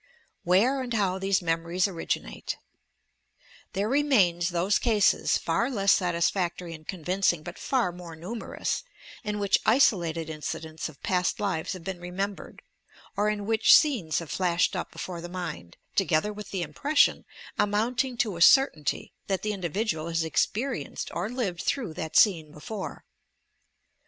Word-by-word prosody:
i 475 - -19
WHEBB 245 +9 +4
AND 245 -2 -4
HOW 190 -3 +1
THESE 195 0 +1
'MEMORIES" 170 +3 0
OBIQINATE 165 - -4 1.2
There 200 +2 0
remain 240 -11 +3
those 180 +3 +1
cases, 215 -4 +3
far 230 +10 0
less 200 -6 +2
satisfactory 175 -1 0
and 155 -1 -12
convincing 180 -2 0
but 175 +3 -8
far 255 -9 +1
more 175 -2 -10
numerous, 190 +9 -4 0.4
in 210 -1 -2
which 200 -1 +2
isolated 170 - +3
in 155 -1 -7
cidents 160 +1 -4
of 150 - -17
past 180 -1 0
lives 190 -5 -1
have 185 -3 -9
been 190 0 -5
remembered, 190 +3 -5 0.5
or 210 +1 +2
in 205 -1 -2
which 220 +1 +6
scenes 225 - +2
have 165 -4 -4
flashed 180 +1 +1
up 180 - -4
before 175 -2 -6
the 175 - -7
mind, 90 - -6 0.2
together 190 +1 +2
with 210 0 -9
the 190 -3 -2
impression, 285 - +2 0.4
amounting 235 +5 +1
to 210 -7 0
a - - -7
certainty, 165 - +4
that 195 -2 -1
the 215 - 0
in 195 - -7
dividual 170 -2 -1
has 165 -1 0
experienced 210 - -2
or 180 +5 -2
lived 220 -9 -2
through 235 - -2
that 160 0 -2
scene 165 -8 +4
before. 190 +7 -7
185 Hz, 150 wpm, -27 LUFS, 170-210 Hz, 1.2 s, which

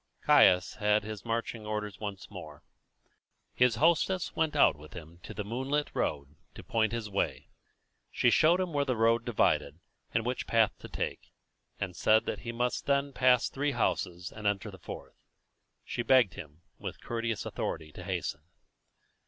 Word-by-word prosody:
Caius 90 0 +5
had 105 0 +3
his 110 -1 -7
marching 115 -1 -3
orders 105 -1 -4
once 100 -3 -6
more. - - -10 0.9
His 125 -2 +3
hostess 170 +6 +2
went 160 -2 0
out - - +5
with 75 0 -14
him 85 0 -10
to - - -9
the 105 - -4
moonlit 130 +7 -2
road 70 0 -2 0.2
to - - -9
point 110 -2 +1
his 115 -2 -3
way. 100 -1 -2 0.6
She 120 - +2
showed 165 +7 +5
him 180 -3 -2
where 145 -1 +2
the 130 -3 -1
road 115 +1 +3
divided, 120 -3 +1 0.3
and 115 0 0
which 125 +1 -2
path 115 -2 +4
to - - -9
take, - - -4 0.5
and 95 -3 -3
said 110 +3 +3
that - - -3
he 120 - -5
must 120 +1 -2
then 140 0 +1
pass 125 -1 +4
three 145 +1 -1
houses 90 0 -1
and 105 -1 -4
enter 105 +1 -1
the 95 - -12
fourth. - - -9 0.7
She - - -3
begged 120 -6 +4
him, 75 +3 -11 0.2
with - - -6
courteous 115 -1 -3
authority, 75 -1 -4
to - - -10
hasten. - - -3
115 Hz, 170 wpm, -30 LUFS, 100-125 Hz, 0.9 s, Caius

